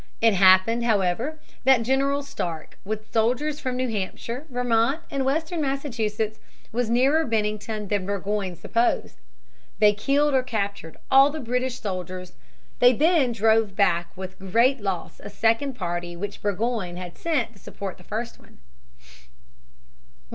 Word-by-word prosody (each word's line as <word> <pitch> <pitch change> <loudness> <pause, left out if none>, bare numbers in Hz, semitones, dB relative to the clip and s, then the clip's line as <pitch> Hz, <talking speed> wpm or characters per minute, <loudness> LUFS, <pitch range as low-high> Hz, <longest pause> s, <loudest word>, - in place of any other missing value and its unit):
It 225 -1 +4
happened, 190 +5 +5
however, 225 - +1 0.3
that 260 -2 +5
General 275 +3 +1
Stark, 170 - -5
with 215 +2 -6
soldiers 250 +7 +1
from 255 -1 -3
New 255 0 0
Hampshire, 230 +6 -4
Vermont, 245 +3 +1
and 275 -2 -1
western 315 +5 -1
Massachusetts, 225 -6 -2 0.3
was 240 0 -1
nearer 270 +7 +3
Bennington 215 -2 -2
than 195 -2 -1
Burgoyne 200 -2 -2
supposed. 230 +7 0 0.6
They 210 -1 +5
killed 280 +7 +1
or 260 - +4
captured 200 -9 -4
all 270 +1 +7
the 310 +2 -5
British 250 0 -2
soldiers. 185 -2 -5 0.5
They 245 +1 +7
then 300 -1 +3
drove 220 -2 +2
back 175 -4 +2
with 190 0 -7
great 230 +7 +2
loss 195 -3 -4
a - - -7
second 230 +6 +1
party 175 -4 -4
which 200 +3 -6
Burgoyne 205 -3 -2
had 180 -1 -7
sent 280 -9 -1
to 200 - -19
support 195 -1 -7
the - - -15
first 230 +5 -5
one. - - -20
225 Hz, 140 wpm, -25 LUFS, 200-260 Hz, 0.6 s, all